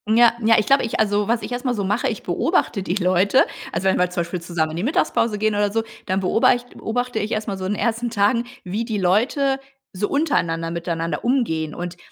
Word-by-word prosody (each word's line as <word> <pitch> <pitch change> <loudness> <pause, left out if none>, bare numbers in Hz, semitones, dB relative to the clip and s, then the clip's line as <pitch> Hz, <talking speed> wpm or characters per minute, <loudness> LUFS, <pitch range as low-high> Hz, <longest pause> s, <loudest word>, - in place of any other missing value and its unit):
Ja, 235 0 +6
ja, 225 +1 +5
ich 210 - +2
glaube 275 -1 +4
ich 230 - -3
also 205 -1 +1
was 230 0 +1
ich - - -7
erst 245 +2 -4
mal 250 - +1
so 205 -3 -2
mache, 210 +5 0
ich - - -4
beobachte 200 -4 0
die 185 0 -2
Leute. 185 +6 +3 0.3
Also 185 +3 -1
wenn - - +2
wir 180 0 +2
zum 180 -1 -2
Beispiel 170 +1 -4
zusammen 170 -2 -1
in 160 - -5
die 180 - -2
Mittagspause 230 -5 +1
gehen 215 0 +1
oder 205 0 +1
so, 225 +1 0 0.2
dann 190 0 0
beobach 235 +5 +3
beobachte 245 0 -2
ich 210 +2 -3
erst 215 +1 -2
mal 195 - -3
so 185 - -5
in 200 - 0
den - - -4
ersten 235 0 0
Tagen, 230 +2 +2 0.2
wie 205 +5 -3
die 220 -2 -2
Leute 265 +9 +2 0.3
so 200 +2 -2
untereinander 165 - 0
miteinander 170 0 -3
umgehen 165 - 0
und 175 0 -6
205 Hz, 235 wpm, -22 LUFS, 180-235 Hz, 0.3 s, Ja